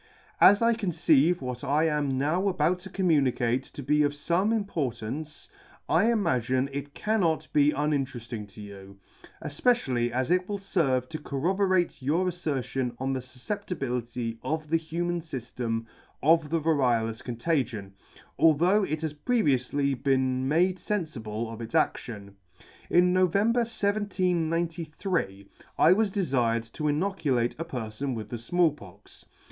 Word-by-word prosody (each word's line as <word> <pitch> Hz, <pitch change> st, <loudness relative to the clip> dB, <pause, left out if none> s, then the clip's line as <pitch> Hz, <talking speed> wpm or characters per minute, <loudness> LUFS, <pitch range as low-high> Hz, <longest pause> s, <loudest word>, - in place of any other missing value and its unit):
As 205 Hz, +3 st, +7 dB
I 235 Hz, 0 st, +4 dB
conceive 175 Hz, -6 st, +2 dB
what 125 Hz, -1 st, -5 dB
I 150 Hz, +3 st, +2 dB
am 150 Hz, -4 st, 0 dB
now 165 Hz, +8 st, +1 dB
about 180 Hz, -1 st, +1 dB
to 190 Hz, +1 st, -10 dB
communicate 135 Hz, -10 st, +1 dB
to 145 Hz, -, -9 dB
be 150 Hz, +3 st, +2 dB
of 145 Hz, -1 st, +2 dB
fome 175 Hz, +8 st, 0 dB
importance, 155 Hz, -, -3 dB, 0.4 s
I 230 Hz, -, +3 dB
imagine 130 Hz, -, +1 dB
it 140 Hz, +1 st, -6 dB
cannot 190 Hz, -8 st, 0 dB
be 145 Hz, 0 st, +5 dB
uninterefting 130 Hz, -7 st, -2 dB
to 100 Hz, +2 st, -13 dB
you, 100 Hz, -1 st, -11 dB, 0.5 s
efpecially 140 Hz, -, +1 dB
as 125 Hz, +3 st, -1 dB
it 180 Hz, +1 st, +1 dB
will 205 Hz, -, -1 dB
ferve 155 Hz, -10 st, 0 dB
to 155 Hz, -, -5 dB
corroborate 180 Hz, +4 st, 0 dB
your 155 Hz, +8 st, +1 dB
aflertion 135 Hz, -8 st, -2 dB
of 135 Hz, +1 st, -1 dB
the 130 Hz, -, -1 dB
fufceptibility 125 Hz, -, -4 dB
of 155 Hz, 0 st, -3 dB
the 165 Hz, -, +4 dB
human 170 Hz, +2 st, -2 dB
fyftem 120 Hz, -6 st, -4 dB, 0.4 s
of 160 Hz, 0 st, +4 dB
the 165 Hz, +2 st, +1 dB
variolous 125 Hz, -7 st, +1 dB
contagion, 120 Hz, -6 st, -2 dB, 0.5 s
although 170 Hz, +7 st, +4 dB
it 155 Hz, -4 st, -2 dB
has 160 Hz, -2 st, -2 dB
previoufly 145 Hz, -, +1 dB
been 130 Hz, -1 st, +1 dB
made 175 Hz, +5 st, +2 dB
fenlible 115 Hz, -, -3 dB
of 115 Hz, -, -8 dB
its 115 Hz, 0 st, -6 dB
addon. 100 Hz, -4 st, -1 dB, 0.6 s
In 180 Hz, +1 st, +4 dB
November 200 Hz, +6 st, +3 dB
1793, 175 Hz, -, -1 dB, 0.3 s
I 170 Hz, -, +6 dB
was 215 Hz, +1 st, +2 dB
defired 125 Hz, -, 0 dB
to 150 Hz, -, -2 dB
inoculate 145 Hz, -7 st, 0 dB
a 165 Hz, -, -3 dB
perfon 125 Hz, -2 st, -4 dB
with 110 Hz, -2 st, -6 dB
the 120 Hz, -, -5 dB
Small 170 Hz, +7 st, +2 dB
Pox. 105 Hz, -8 st, -15 dB
150 Hz, 135 wpm, -27 LUFS, 125-180 Hz, 0.6 s, As